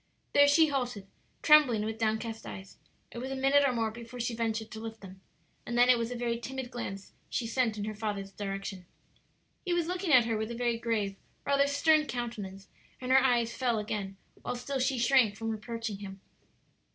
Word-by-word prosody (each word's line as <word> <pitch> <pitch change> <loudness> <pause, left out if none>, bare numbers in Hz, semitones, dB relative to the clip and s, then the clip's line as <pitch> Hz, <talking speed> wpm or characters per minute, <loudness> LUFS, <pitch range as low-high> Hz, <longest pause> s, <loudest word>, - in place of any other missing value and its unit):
There 285 0 +7
she 310 +2 +5
halted, 245 -8 -2 0.4
trembling 295 -8 +6
and - - -2
with 220 0 -4
downcast 220 0 -1
eyes. 190 0 -9 0.3
It 235 - -7
was 260 +2 -4
a 270 - -3
minute 275 +2 +4
or 275 - +3
more 225 -2 -1
before 235 +2 -10
she 235 0 -1
ventured 225 -1 -2
to 220 - -7
lift 225 0 -7
them, 190 -1 -12 0.4
and 240 - -3
then 245 +1 +6
it 250 - +7
was 230 0 -1
a 245 - -4
very 235 -1 -1
timid 260 +1 -6
glance 195 -5 -6 0.2
she 240 - -2
sent 225 -2 0
in 205 - -3
her 215 - -3
father's 205 -2 -4
direction. 195 -2 -5 0.8
He 355 -2 0
was 345 -2 +1
looking 360 0 -2
at 250 -4 +7
her 225 -1 0
with 220 +1 -3
a 235 - -5
very 235 -1 0
grave, 215 -4 -1 0.3
rather 280 0 +3
stern, 305 +2 +3
countenance, 210 -6 -5 0.3
and 255 0 -3
her 265 0 +6
eyes 240 -3 +2
fell 245 -3 0
again, 205 -2 -4 0.2
while - - -3
still 265 +3 -3
she 260 +1 +1
shrank 240 -3 +4
from 225 +1 -3
approaching 225 -1 -5
him. 195 -1 -8
235 Hz, 205 wpm, -30 LUFS, 215-260 Hz, 0.8 s, There